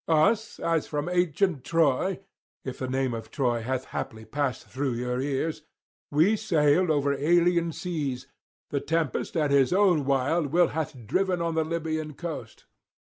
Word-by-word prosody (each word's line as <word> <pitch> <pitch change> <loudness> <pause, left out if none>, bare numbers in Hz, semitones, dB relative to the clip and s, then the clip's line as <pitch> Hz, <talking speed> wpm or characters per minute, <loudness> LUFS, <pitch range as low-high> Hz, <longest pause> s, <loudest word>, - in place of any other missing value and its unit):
Us, 205 +8 +2
as 165 -2 0
from 150 +1 -3
ancient 175 -3 +1
Troy 165 +4 +1 0.4
(if 130 - -5
the 130 - -2
name 130 -1 0
of 115 -1 -6
Troy 120 -5 0
hath 130 +2 -2
haply 110 -1 -5
passed 140 +3 -2
through 135 0 -2
your 125 +1 -2
ears) 145 +3 -2 0.5
we 165 +9 +4
sailed 175 -4 +2
over 145 -2 +2
alien 170 +3 +2
seas, 145 -8 -3 0.5
the 140 - 0
tempest 165 0 -1
at 150 -3 +1
his 135 -2 +4
own 180 -6 +3
wild 140 +4 +1
will 175 +5 +3
hath 155 -3 -3
driven 185 - +1
on 170 -1 -1
the 160 0 +1
Libyan 155 -2 -3
coast. 170 0 -7
155 Hz, 155 wpm, -27 LUFS, 135-170 Hz, 0.5 s, we